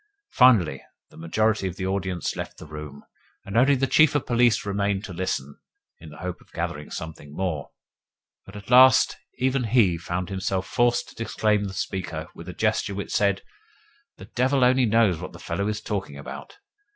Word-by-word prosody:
Finally, 105 - +4 0.3
the - - -17
majority 105 +5 0
of 90 - -5
the 95 - -4
audience 95 -3 -2
left - - -6
the - - -10
room, 75 -2 -9 0.4
and 100 - -7
only 135 +4 +5
the 135 +1 +1
Chief 150 +3 +4
of 145 - 0
Police 120 -2 +2
remained 100 0 -1
to 95 - -8
listen 85 -6 -3 0.4
(in 80 - -11
the 75 - -12
hope 90 -1 -6
of - - -23
gathering 75 0 -4
something 75 -2 -8
more); 85 -7 -3 0.7
but 100 - -14
at 105 +3 -9
last 130 -1 +7 0.2
even 130 -1 +1
he 105 -8 +3
found 90 +2 -4
himself 95 -1 -2
forced 120 +4 +1
to 115 - -6
disclaim 105 -2 +1
the 95 - -5
speaker 85 -4 -4
with 85 +2 -10
a - - -6
gesture 110 -1 0
which 100 - -5
said: 100 -2 +1 0.7
"The - - -10
devil 130 +2 +1
only 125 0 +4
knows 105 -6 +3
what - - -7
the - - -11
fellow 100 +4 -3
is 105 0 -2
talking 95 -10 -4
about!" 70 - -9
100 Hz, 185 wpm, -25 LUFS, 85-115 Hz, 0.7 s, last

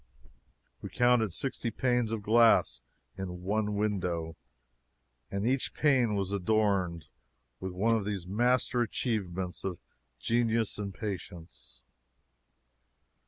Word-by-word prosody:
We - - -6
counted 120 -4 +3
sixty 130 +4 -2
panes 120 0 0
of 110 -2 -3
glass 110 - +4 0.4
in 90 -2 -5
one 105 +2 0
window, 90 -6 -1 0.9
and 100 +1 -2
each 130 +2 0
pane 130 -7 +3
was 100 -1 -1
adorned 100 -4 +1 0.5
with 95 - -4
one 110 +5 +2
of 110 - 0
these 100 -4 -3
master 120 +5 +2
achievements 95 -7 -2
of 95 -3 -3 0.4
genius 115 - +1
and 100 -1 -3
patience. 85 - -7
105 Hz, 110 wpm, -30 LUFS, 90-115 Hz, 0.9 s, glass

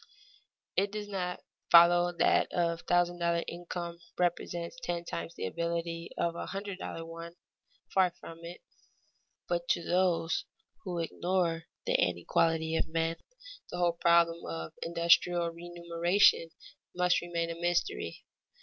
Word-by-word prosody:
It 195 +1 +2
does 210 0 -5
not 180 -3 -3 0.3
follow 175 +1 +7
that - - +4
a 170 -1 +1
thousand 175 +1 +1
dollar 170 0 +1
income 170 0 -5 0.2
represents 175 +4 -1
ten 175 -7 -3
times 170 0 -5
the - - -4
ability 170 - -3
of 170 -1 0
a - - -5
hundred 195 -1 -5
dollar 165 -3 -5
one 165 +1 -9 0.6
far 190 -1 +5
from 165 0 -10
it. 170 +1 -8 0.9
But 175 0 -1
to 170 - +1
those 175 -2 +1 0.4
who 180 -2 -3
ignore 170 0 -1 0.2
the - - +1
inequality 160 - +1
of - - 0
men, 165 +1 -1 0.5
the - - -5
whole 175 -1 +2
problem 170 0 +4
of 80 -1 -5
industrial 170 0 +3
remuneration 170 +1 +2 0.5
must 180 0 +3
remain 170 -1 -2
a - - -5
mystery. 175 - -1
170 Hz, 130 wpm, -31 LUFS, 165-175 Hz, 0.9 s, follow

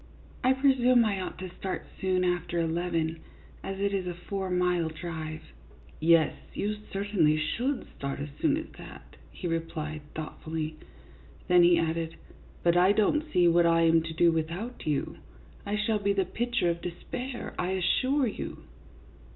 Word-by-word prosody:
I 255 +1 +5
presume 255 -3 +4
I 200 -3 0
ought - - -5
to 185 -1 -7
start 190 - -3
soon 185 -1 +1
after 175 -1 0
eleven, 165 -1 -1 0.4
as 195 0 -5
it 200 0 0
is 190 -2 -1
a 175 - -3
four 190 +2 -4
mile 180 -2 +1
drive." 160 -1 -6 0.3
" - - -23
Yes, 165 0 +5 0.2
you 210 +1 -1 0.2
certainly 195 -6 +2
should 240 - -1
start 140 0 -4
as 145 +1 -4
soon 305 -2 +3
as 320 - -4
that," - - -12
he 180 - -6
replied, 160 -2 -3
thoughtfully. 155 0 -4 0.7
Then 180 0 +6
he 175 0 +6
added, 165 0 -1 0.2
" - - -24
But 170 0 +4
I 185 +3 +6
don't 300 +9 +1
see 175 -7 +4
what 170 0 +5
I 165 0 +4
am 165 0 +5
to 160 0 -5
do 170 +1 +5
without 170 +10 -3
you. 150 -2 -1 0.5
I 205 - 0
shall 210 0 +1
be 200 0 +1
the 195 -1 +1
picture 240 -3 0
of 170 0 -5
despair, 240 +8 -5
I 180 - 0
assure 260 +9 +2
you." 215 - -5
180 Hz, 165 wpm, -29 LUFS, 165-205 Hz, 0.7 s, Then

